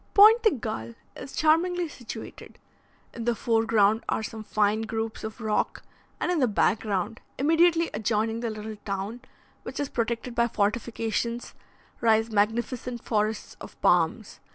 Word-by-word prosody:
Pointe 435 +3 +8
de 440 - +5
Galle 215 - -5 0.2
is 275 - -9
charmingly 345 +3 +2
situated: 250 -6 -9 0.6
in 230 -1 -6
the 240 -1 +2
fore 225 0 +1
ground 220 0 +3
are - - 0
some 220 0 -6
fine 215 +1 +1
groups 225 0 -4
of 220 +2 -6
rock, 215 -2 -1 0.4
and 355 - 0
in 350 - +1
the 255 - +4
back 215 0 +2
ground, 210 +2 -2 0.2
immediately 330 +3 +3
adjoining 220 +1 0
the 235 -1 -2
little 215 0 -6
town, 205 +3 -4 0.4
which - - -7
is 285 -2 -1
protected 235 +1 -2
by 235 0 +2
fortifications, 230 +2 -1 0.5
rise 225 -1 +3
magnificent 235 +3 -1
forests 215 -1 -1
of - - -11
palms. - - +2
225 Hz, 150 wpm, -27 LUFS, 215-250 Hz, 0.6 s, Pointe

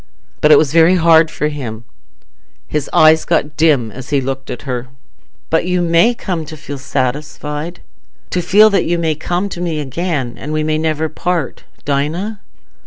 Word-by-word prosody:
But 150 - +5
it 150 - +9
was 150 -1 +1
very 165 +2 +5
hard 165 -2 +5
for 150 - -2
him; 120 -7 -6 0.8
his 150 -2 -3
eyes 155 0 +5
got 150 0 0
dim 145 -8 +2
as 130 +2 -10
he 140 - +2
looked 135 0 -4
at 120 - -6
her. 125 -2 -4 0.6
"But 165 +1 +2
you 180 0 +1
may 170 +7 +3
come 180 -7 -3
to 155 0 -9
feel 145 -2 -7
satisfied... 150 +5 -3 0.5
to 180 - 0
feel 210 +5 +5
that 195 -3 +2
you 175 +1 0
may 165 -2 0
come 175 +5 -2
to 175 - -6
me 165 -3 -2
again, 145 -3 -3
and 150 - -6
we 155 0 0
may 155 0 0
never 160 0 0
part, 175 0 -3 0.2
Dinah?" 160 +10 -2
155 Hz, 175 wpm, -16 LUFS, 145-170 Hz, 0.8 s, it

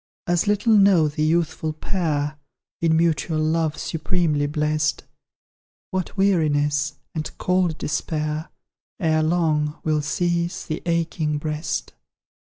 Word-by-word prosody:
As 175 +3 +1
little 210 +2 +3
know 195 -6 +5
the 150 +1 -4
youthful 160 0 +1
pair, 155 -3 -2 0.4
In 160 -1 +3
mutual 165 -1 +1
love 155 0 +1
supremely 155 -2 0
blest, 150 -1 0 0.9
What 185 +1 -3
weariness, 150 -6 +2 0.2
and 155 -2 -3
cold 180 -3 +1
despair, 155 +1 -2 0.5
Ere 160 -2 +2
long, 155 -2 +1
will 155 -1 +1
seize 175 +3 -1
the 155 - -4
aching 165 -2 0
breast. 150 - -3
155 Hz, 110 wpm, -23 LUFS, 150-170 Hz, 0.9 s, know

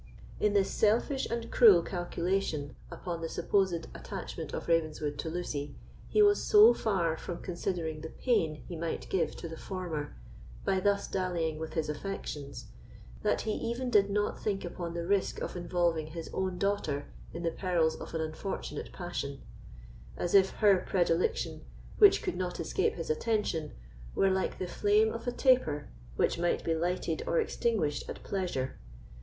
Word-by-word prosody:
In 210 -1 +2
this 200 -2 +3
selfish 235 +6 +2
and 230 0 -3
cruel 200 -8 +7
calculation 175 -5 -2
upon 170 -3 -5
the 165 - -3
supposed 175 -1 +1
attachment - - -6
of - - -5
Ravenswood 155 -3 0
to 160 - -2
Lucy, 150 -4 -4 0.3
he 425 - +5
was 410 0 +5
so 430 +2 +8
far 175 -7 0
from 170 +1 -6
considering 170 -3 -3
the 160 - -6
pain 160 - 0
he 175 - -6
might 165 0 -3
give 190 - 0
to - - -6
the 160 0 -8
former, 175 -6 -4 0.5
by 190 - +2
thus 200 +1 +1
dallying 170 -4 -1
with 160 0 -5
his 160 -2 0
affections, 150 -3 -5 0.6
that - - +1
he 220 - -2
even 240 +3 -2
did 200 -2 +5
not 205 +1 -1
think 195 -3 -1
upon 170 -1 -5
the 170 0 -2
risk 200 +1 +1
of - - -4
involving 175 -3 0
his 165 +1 -7
own 185 -1 -1
daughter 180 -8 0 0.3
in 170 - -6
the 165 - +1
perils 170 -4 +1
of - - -8
an 160 - 0
unfortunate 160 +5 -4
passion; 140 -6 -5 0.7
as 175 - -2
if 195 -1 +7
her 200 -4 +4
predilection, 175 -2 0 0.4
which 410 -2 +7
could - - -2
not 180 -1 -3
escape 165 - 0
his 165 -2 -2
attention, 195 -3 -1 0.4
were 195 - +3
like 190 0 0
the 185 - -3
flame 210 +4 +2
of 230 +1 -6
a - - +2
taper 245 - +2 0.3
which - - +1
might 175 0 +1
be 165 - +1
lighted 175 - -1
or - - +2
extinguished 220 - 0
at - - -7
pleasure. 175 -10 -2
180 Hz, 165 wpm, -31 LUFS, 160-200 Hz, 0.7 s, so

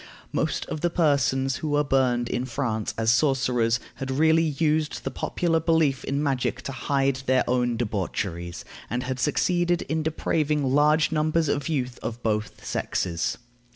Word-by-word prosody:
Most - - -1
of 155 - -5
the 175 - +2
persons 135 -5 +1
who 155 - -4
were 145 0 +2
burned 125 -3 +1
in 125 - -2
France 115 -4 -2
as 115 0 +3
sorcerers 125 -4 +2 0.2
had 135 - -5
really 160 +4 +4 0.2
used 155 -1 0
the 135 - -3
popular 165 +5 0
belief 160 -4 +2
in 140 +2 -1
magic 130 -2 -1
to - - -4
hide 135 0 0
their 130 0 +3
own 120 -1 +1
debaucheries, 95 -5 -3 0.2
and 125 +2 -2
had 130 0 -3
succeeded 175 +5 +1
in 160 0 -1
depraving 155 -1 0
large 150 +3 +4
numbers 155 +1 +1
of 145 0 -1
youth 130 -5 -2
of 120 +1 -5
both 105 -1 -2
sexes. 85 -3 -2
135 Hz, 155 wpm, -25 LUFS, 120-155 Hz, 0.2 s, really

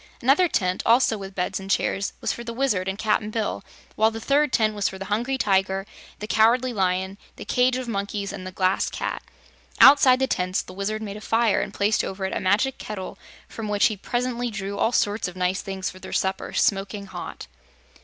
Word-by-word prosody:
Another 280 +9 +4
tent, 185 - 0
also 230 0 +4
with 195 -2 -8
beds 180 +1 -2
and 195 0 -9
chairs, 200 0 0
was - - 0
for 235 - -7
the 235 0 -6
Wizard 225 -8 0
and 190 +1 -2
Cap'n 210 0 0
Bill, 215 -1 -2 0.3
while 220 +1 +4
the 225 0 -6
third 285 +4 +2
tent 215 -3 +2
was 205 -1 0
for 190 - -8
the 195 - -6
Hungry 245 +5 -1
Tiger, 195 -3 +1 0.3
the 210 - -6
Cowardly 240 +4 +3
Lion, 190 0 -1 0.2
the - - -9
cage 250 0 +2
of 255 -1 -5
Monkeys 200 -2 -3
and 185 - -7
the - - -6
Glass 185 +1 +1
Cat. - - -4 0.6
Outside 270 -2 +8
the 265 - +1
tents 185 -7 -1
the 185 - -12
Wizard 210 +3 -3
made 205 -1 -6
a - - -10
fire 225 -1 +2
and - - -4
placed 210 +2 +1
over 190 0 -4
it 190 - -3
a - - 0
magic 210 +8 +1
kettle 200 -2 -7 0.3
from 225 -2 -6
which 205 -1 +2
he 215 - +2
presently 245 +3 -2
drew 200 -2 -5
all 225 - +2
sorts 205 -4 +1
of 180 - -8
nice 185 +1 0
things 190 -1 -4
for 185 - -13
their 190 - -9
supper, 190 0 -1
smoking 200 0 0
hot. - - -8
205 Hz, 215 wpm, -24 LUFS, 190-235 Hz, 0.6 s, Outside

